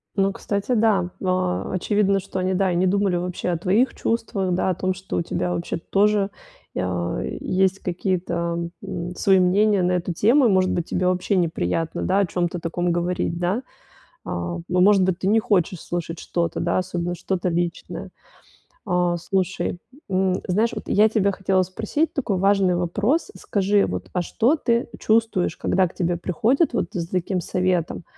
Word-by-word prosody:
Ну, 195 0 +2
кстати, 200 +4 -2
да, 210 -6 +2
а, 185 -1 0
очевидно, 200 +1 +2
что 190 0 -7
они, 185 +1 0
да, 190 0 +1
и - - -1
не 180 +2 +2
думали 195 0 +2
вообще 180 0 -2
о 175 - 0
твоих 200 +9 +2
чувствах, 205 -5 -1
да, 185 - +1
о 185 - 0
том, 185 +1 -1
что 190 +1 -5
у - - +1
тебя 175 - -2
вообще-то 170 -1 -4
тоже, 205 0 +3 0.5
э, 90 -1 -2
есть 190 +1 +1
какие-то, 170 -2 -2
м, 175 +1 -5
свои 190 0 +4
мнения 200 +2 +3
на 180 +1 +2
эту 180 0 -1
тему. 240 - +4
И, 230 - +5
может 185 -1 +3
быть, 170 - -1
тебе 180 0 0
вообще 185 +2 +1
неприятно, 165 - -1
да, 190 +2 +2
о 200 - +3
чём-то 175 0 -2
таком 175 +1 -1
говорить, 175 0 -1
да. 180 +7 0 0.6
А 85 0 -3
а, - - -5
может 190 +2 +4
быть, 185 -1 +1
ты - - -3
не 220 +3 +4
хочешь 185 -5 +1
слушать 170 -1 -4
что-то, 170 -1 -2
да, 170 - +1
особенно 175 -1 -2
что-то 185 +1 -2
личное. 175 0 -3 0.8
А. 180 -2 +1
Слушай, 185 0 -1 0.3
м, 190 -1 +1
знаешь, 215 +6 +2
вот - - -6
я 215 +2 +5
тебя 200 -2 +2
хотела 190 0 +1
спросить 220 - -1
такой 235 -9 -1
важный 195 -1 +3
вопрос. 205 - 0
Скажи 200 0 +1
вот, - - -5
а 180 - +1
что 240 - +2
ты 235 -6 0
чувствуешь, 220 -4 +1
когда 190 -1 +2
к 175 - -10
тебе 175 -1 0
приходят 225 - +1
вот 235 - 0
за 170 -2 -3
таким 185 0 -1
советом? 180 -2 -1
185 Hz, 175 wpm, -23 LUFS, 175-200 Hz, 0.8 s, И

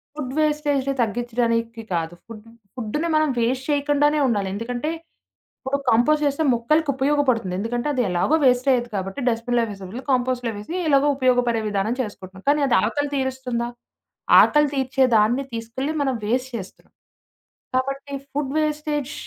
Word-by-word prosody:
Food 270 -4 -5
వేస్టేజ్‌ని 295 -3 +1
తగ్గిచ్చడానికి 230 0 -1
కాదు. 165 0 -2
Food 225 -1 -11 0.3
ఫుడ్‌ని 260 +8 -2
మనం 310 -1 +3
వేస్ట్ 255 +3 0
చేయకుండానే 290 +1 +2
ఉండాలి. 205 -5 0
ఎందుకంటే, 240 +7 -3 0.8
ఇప్పుడు 270 +2 0
కంపోస్ట్ 295 +7 +3
జేస్తె 285 +3 0
మొక్కలకి 300 +6 +1
ఉపయోగపడుతుంది. 265 -8 +1
ఎందుకంటే, 240 +4 -2
అది 255 - +1
ఎలాగో 180 - +2
వేస్టయ్యేది 250 -1 +2
కాబట్టి, 195 +7 -4
డస్ట్‌బిన్‌లో 235 0 0
వేసే 195 -1 -9
బదులు 245 +6 -7
కంపోస్ట్‌లో 250 -2 0
వేసి 210 +12 -7
ఎలాగో 285 0 +4
ఉపయోగపడే 245 -3 +2
విధానం 205 +4 -1
చేసుకుంటున్నాం. 190 -3 -9
కానీ, 295 0 +2
అది 240 - +4
ఆకలి 290 -1 -1
తీరుస్తుందా? 260 -3 -2 0.7
ఆకలి 300 -1 +3
తీర్చేదాన్ని 255 -2 +2
తీసుకెళ్లి 230 +6 -3
మనం 265 -2 0
వేస్ట్ 250 +4 -1
చేస్తున్నాం. 190 -3 -10 0.8
కాబట్టి, 275 +2 -2 0.2
ఫుడ్ 275 -1 -2
వేస్టేజ్ 300 -2 -2
255 Hz, 135 wpm, -22 LUFS, 230-285 Hz, 0.8 s, ఎలాగో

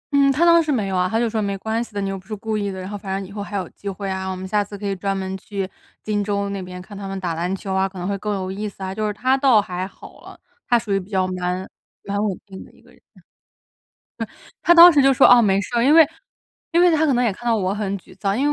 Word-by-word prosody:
嗯， 275 -1 +5
他 310 +6 +2
当 335 -1 +6
时 310 - -1
没 215 -8 0
有 190 - -2
啊， 180 0 +1
他 225 - 0
就 235 - +1
说： 220 -1 -1
“没 200 -1 -2
关 220 +4 -2
系 235 - -13
的， 200 - -1
你 195 - -2
又 195 - -3
不 185 - -21
是 215 - -4
故 220 +1 -4
意 205 -1 -1
的， 190 -1 -6
然 185 - -6
后 205 - -6
反 195 -1 -4
正 195 - -7
以 200 - -13
后 205 0 -6
还 205 0 -4
有 185 -3 -3
机 200 - -7
会 195 +1 -5
啊， 190 0 -3
我 185 - -3
们 190 +1 -6
下 210 +1 +1
次 205 0 -9
可 205 - -7
以 195 - -1
专 195 +1 -2
门 190 0 -4
去 195 -1 -4 0.4
金 205 -1 -1
州 200 -1 -1
那 200 -1 -4
边 180 0 -8
看 205 +3 -11
他 200 0 -6
们 195 0 -4
打 175 -3 -2
篮 175 +4 -2
球 190 0 -5
啊， 190 0 +1
可 190 - -13
能 180 - -4
会 200 - -1
更 210 +2 -3
有 185 -1 -4
意 210 +2 -4
思 195 - -11
啊。” 190 0 -4
就 215 +1 -2
是 210 - -1
他 255 +5 +1
倒 265 -5 +4
还 185 -2 -3
好 195 - -15
了， - - -13 0.3
他 240 - +5
属 215 -4 -3
于 195 - +2
比 190 +2 -11
较 190 -2 +1
蛮 180 +1 -3 0.4
蛮 200 +1 -2
稳 195 -4 -1
定 190 -1 -10
的 - - -18
一 - - -22
个 - - -21
人。 - - -23
嗯。 - - -19 1.2
嗯， - - -19
他 345 - +5
当 345 +1 +10
时 290 - +4
就 270 0 +5
说 - - +5
哦 245 -1 +8
没 195 -2 +2
事 205 - -8
儿， 235 - +3
因 295 - +5
为 325 -2 +9 0.7
因 340 - +5
为 355 -1 +6
他 315 0 +3
可 280 - +2
能 245 0 +2
也 225 - +2
看 240 +5 -8
到 230 - +3
我 190 -2 0
很 200 -1 -2
沮 185 - -17
丧， 200 +1 0
因 275 - +1
200 Hz, 345 characters per minute, -21 LUFS, 190-225 Hz, 1.2 s, 当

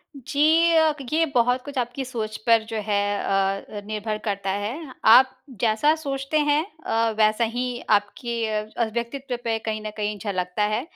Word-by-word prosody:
जी। 280 +2 -6 0.4
अ, 315 -1 +4 0.2
ये 325 +1 +3
बहुत 245 +1 +3
कुछ 285 -2 -7
आपकी 245 +2 -2
सोच 220 -4 -4
पर 230 -1 +5
जो 225 - -3
है 205 -1 +2 0.2
अ 195 +1 -1
अ, - - -5
निर्भर 215 0 -3
करता 200 -2 -2
है, 235 +9 -4
आप 260 +4 +7 0.3
जैसा 235 +7 +3
सोचते 280 -1 -2
हैं 295 +1 +2 0.2
अ, 225 0 +1
वैसा 215 +2 +3
ही 240 +2 -1 0.3
आपके 225 +3 0
अ, 215 +2 -2
व्यक्तित्व 250 +2 -3
पे 225 -1 0
कहीं 215 -1 -3
न 215 - -3
कहीं 210 0 -2
झलक्ता 185 -1 -2
है। 220 - 0
230 Hz, 170 wpm, -24 LUFS, 215-260 Hz, 0.4 s, आप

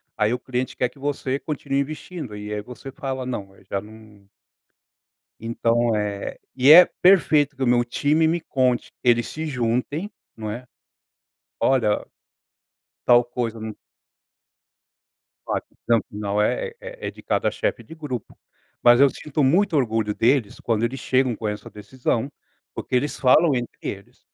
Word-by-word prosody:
Aí 105 +3 +1
o 125 - -2
cliente 125 0 -3
quer 125 - +2
que 140 - -19
você 135 -1 -2
continue 140 -2 -2
investindo, 150 -5 -6
e 105 +1 -6
aí 105 - -2
eh - - -5
você 125 +5 -10
fala: 135 -3 -4
"Não", 105 -6 -4 0.2
já 100 - -1
não 105 -1 -15 1.2
Então 115 0 +1
é 105 -1 -3 0.2
e 135 +3 +6
é 180 +3 +11 0.2
perfeito 150 -6 +5
que 130 - -3
o - - +1
meu 120 0 +4
time 150 +6 +2
me 170 +2 +1
conte, 130 -5 0
eles 120 -1 +3
se 160 +1 -5
juntem, 125 - -1 0.3
não 110 -1 -4
é, 120 +4 -7 1.0
olha, 120 -6 +2 1.0
tal 120 0 +6
coisa 120 -2 -3
no 110 0 -6 1.7
Claro. - - -1
A - - -41
decisão 115 -1 +1
final 105 0 -1
é 470 - 0
é - - -7
é - - -4
de - - -15
cada - - 0
chefe - - -2
de - - -12
grupo, 135 -8 -6 0.4
mas 120 0 +6
eu 140 0 +7
sinto 150 +2 -3
muito 170 +6 +3
orgulho 110 -6 +1
deles, 120 -2 +1
quando 115 -1 0
eles 130 +3 -1
chegam 130 -1 +1
com 110 - -4
essa 105 0 -5
decisão, 120 +4 -3 0.4
porque - - -4
eles 145 +4 0
falam 145 +4 +5
entre 120 -2 -3
eles. 100 0 -7
125 Hz, 160 wpm, -23 LUFS, 110-145 Hz, 1.7 s, é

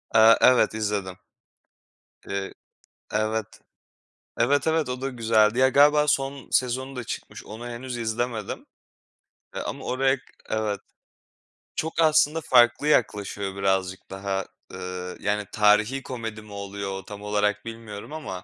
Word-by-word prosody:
Eee, 110 0 +8
evet, 125 -3 +5
izledim. 105 -4 -2 1.1
Eee 100 0 -3 0.6
Evet. 110 0 0 0.9
Evet 140 +6 +2
evet, 160 -4 +1
o 125 0 -4
da 135 - -1
güzeldi. 115 -2 +3
Ya, 130 0 +6
galiba 150 +2 +5
son 140 -1 0
sezonu 130 +1 0
da 125 - -4
çıkmış, - - -7
onu 115 +3 -8
henüz 120 +1 -6
izlemedim. 115 -1 -3 0.9
E, - - -4
ama - - -5
oraya 135 +1 +1 0.3
Evet. 105 -2 -1 1.0
Çok 160 +1 -2
aslında 155 0 +4
farklı 120 +1 +4
yaklaşıyor 100 -7 0
birazcık 95 -1 -1
daha, 95 0 -2 0.3
eee, 90 0 -6
yani, 105 0 -1
tarihî 105 +5 +3
komedi 115 -4 -6
mi 105 - -15
oluyor? 100 -1 -5
Tam 100 +1 -9
olarak 105 0 0
bilmiyorum 115 +2 -8
ama 95 -13 -6
110 Hz, 125 wpm, -25 LUFS, 100-130 Hz, 1.1 s, Eee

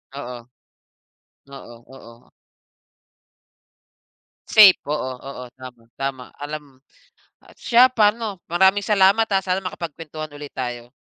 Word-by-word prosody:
Oo. 125 -3 -7 1.1
Oo, 120 -3 -11 0.2
oo. 115 -3 -16 2.2
Safe, 205 -4 +7
oo, 130 -4 -2 0.2
oo, 125 -2 -8
tama, 125 -3 -12 0.2
tama 135 -2 -4 0.2
alam 145 -3 -8 0.6
at - - -18
siya 245 +1 +5
pa'no 210 -3 +1
maraming 190 +4 +3
salamat, 205 +2 +3
ah, 195 -1 +1
sana 185 +1 -1
makapagkwentuhan 155 -3 -7
ulit 145 -1 -10
tayo. 120 -2 -5
150 Hz, 105 wpm, -21 LUFS, 130-195 Hz, 2.2 s, Safe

